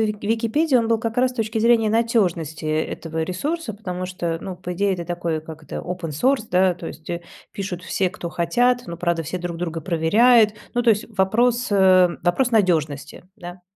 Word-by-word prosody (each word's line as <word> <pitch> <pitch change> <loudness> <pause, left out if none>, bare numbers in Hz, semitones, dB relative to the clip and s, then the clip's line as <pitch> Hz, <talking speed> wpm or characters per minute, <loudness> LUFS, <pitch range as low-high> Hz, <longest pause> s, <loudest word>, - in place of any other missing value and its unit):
Вик 210 -1 -1
Википедии, 230 +7 +1
он 230 -2 +2
был 225 0 +2
как 225 0 -4
раз 250 0 +2
с - - -18
точки 225 -2 -2
зрения 225 -1 +3
надежности, 185 -9 0
э, 155 0 0
этого 160 -1 -4
ресурса, 245 - -3
потому 185 -3 -5
что, 170 -2 -3
ну, 190 0 -6
по 180 0 -6
идее 200 +1 +1
это 175 -1 -5
такой, 170 -2 -2
как 155 0 -11
это, - - -7
open 180 -2 -5
source 245 - +1
да, 180 0 +3
то 170 - -9
есть, 160 -1 -9
э, 170 0 -4 0.3
пишут 190 -3 -5
все, 185 +2 0
кто 175 - -6
хотят, 245 +10 +1
но, 170 - -6
правда, 170 -1 -1
все 175 +5 -4
друг 175 -1 -5
друга 165 -1 -4
проверяют. 210 +8 +4 0.2
Ну, 245 - +1
то 235 - +4
есть 210 -1 +1
вопрос, 240 +5 +2
э, 185 -3 +5
вопрос 240 +8 +1
надежности, 155 -8 0
да. 175 -2 -9
185 Hz, 200 wpm, -22 LUFS, 170-225 Hz, 0.3 s, э